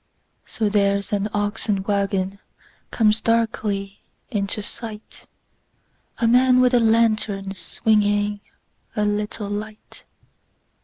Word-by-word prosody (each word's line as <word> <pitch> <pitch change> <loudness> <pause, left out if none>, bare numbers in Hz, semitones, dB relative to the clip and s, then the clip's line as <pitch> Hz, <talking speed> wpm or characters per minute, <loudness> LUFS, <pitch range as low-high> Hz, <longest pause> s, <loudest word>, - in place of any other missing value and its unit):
So, 220 - -1
there's 200 0 +1
an 205 +1 0
oxen 205 -1 -1
wagonComes 200 +2 -1
darkly 215 -4 -1 0.3
into 205 0 -1
sight:A 225 +1 -9
man 250 +2 +5
with 255 0 +4
a 245 - +5
lantern, 220 -4 +1
swingingA 205 0 +1 0.6
little 210 0 -1
light. 210 +1 -7
210 Hz, 85 wpm, -22 LUFS, 200-225 Hz, 0.6 s, man